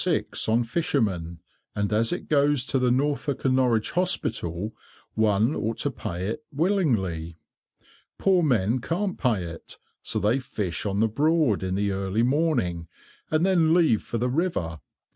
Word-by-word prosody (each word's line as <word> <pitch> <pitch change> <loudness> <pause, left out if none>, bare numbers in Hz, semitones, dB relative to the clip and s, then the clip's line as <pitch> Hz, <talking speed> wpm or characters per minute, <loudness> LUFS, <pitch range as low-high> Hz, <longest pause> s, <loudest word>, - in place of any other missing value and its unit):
on 115 +2 +3
fishermen, 110 - -1 0.4
and 100 0 -1
as 115 +2 +2
it 175 - -4
goes 145 -3 +2
to 135 - 0
the 125 -1 +2
Norfolk 140 +2 0
and 130 -1 +3
Norwich 120 -4 +2
Hospital, 110 - -1 0.4
one 110 +4 +2
ought 110 +1 -2
to 145 - -1
pay 90 -6 -5
it 115 +9 -4
willingly. 115 - 0 0.8
Poor 190 -2 +3
men 120 - +2
can't 180 - -2
pay 115 -9 +1
it, 85 -1 -9 0.2
so - - -4
they 110 +6 +2
fish 105 -9 -3
on 100 +1 0
the 110 - +4
Broad 150 - +2
in 95 0 -2
the 100 0 0
early 95 +3 0
morning, 125 - 0 0.4
and 155 +2 +2
then 170 -4 +3
leave 160 -12 +3
for 115 - -4
the 120 +2 0
river. 125 - -1
115 Hz, 155 wpm, -25 LUFS, 100-150 Hz, 0.8 s, the